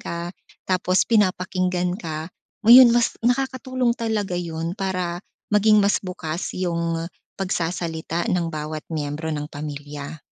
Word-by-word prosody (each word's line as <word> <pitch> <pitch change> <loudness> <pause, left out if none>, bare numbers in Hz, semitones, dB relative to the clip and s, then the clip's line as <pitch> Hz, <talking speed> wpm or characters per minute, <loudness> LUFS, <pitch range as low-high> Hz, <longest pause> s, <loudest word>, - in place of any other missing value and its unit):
ka 170 +1 -5 0.4
tapos 185 0 +2
pinapakinggan 185 -4 +1
ka, 160 -4 -5 0.4
oh, 230 - +5
'yun 250 0 +11
mas 240 -1 +2
nakakatulong 255 -1 +1
talaga 220 -4 -2
'yun 165 -1 -3
para 180 -2 -2 0.3
maging 210 0 +5
mas 200 +1 +2
bukas 180 -2 -4
'yung, 170 -2 -1 0.3
pagsasalita 170 -2 -2
ng 170 -2 0
bawat 155 0 -4
miyembro 150 +1 -3
ng 150 -1 -3
pamilya. 145 0 -7
175 Hz, 120 wpm, -23 LUFS, 160-200 Hz, 0.4 s, yun